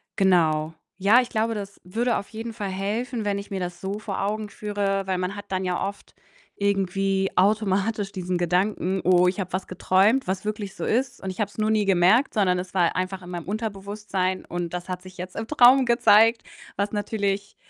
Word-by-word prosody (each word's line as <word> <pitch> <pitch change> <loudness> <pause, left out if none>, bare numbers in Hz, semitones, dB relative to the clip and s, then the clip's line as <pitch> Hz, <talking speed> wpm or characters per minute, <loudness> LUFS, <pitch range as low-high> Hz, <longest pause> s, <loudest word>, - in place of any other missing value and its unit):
genau. 165 -5 +2 0.2
Ja, 205 +6 +5
ich 245 - -6
glaube, 225 +1 0
das 200 -1 -7
würde 230 +7 0
auf 200 - -6
jeden 225 +1 -6
Fall 205 -3 -4
helfen, 215 +5 -3
wenn 200 -1 0
ich 200 - -10
mir 195 - -2
das 175 -1 -5
so 195 +2 -3
vor 215 -2 -4
Augen 210 +1 -2
führe, 200 -2 -2
weil 190 -1 -1
man 185 +2 -2
hat 205 - -8
dann 190 0 -1
ja 180 -1 -1
oft 200 0 -10 0.4
irgendwie 195 -1 0
automatisch 200 +1 +1
diesen 180 -2 -2
Gedanken: 180 +2 0
„Oh, 180 0 +5
ich 185 +3 -1
habe 185 -2 -4
was 185 +1 -2
geträumt, 195 +8 +2
was 190 +1 -2
wirklich 210 -2 -4
so - - -4
ist 255 +2 0
und 190 - -3
ich 185 - -12
habe 210 -2 0
es - - -19
nur 215 0 +1
nie 215 -1 +2
gemerkt, 195 +8 +3
sondern 185 -4 +2
es 180 +1 -7
war 175 -3 +2
einfach 185 +1 -3
in 180 - -9
meinem 175 -2 -5
Unterbewusstsein 200 -3 -3
und 175 -1 -4
das 180 0 -6
hat 180 -1 -4
sich 185 0 -13
jetzt 180 +1 -7
im 225 +1 -4
Traum 260 -1 +6
gezeigt“, 230 -1 +5 0.3
was 200 +1 -1
natürlich 200 -1 -2
195 Hz, 205 wpm, -24 LUFS, 185-215 Hz, 0.4 s, Traum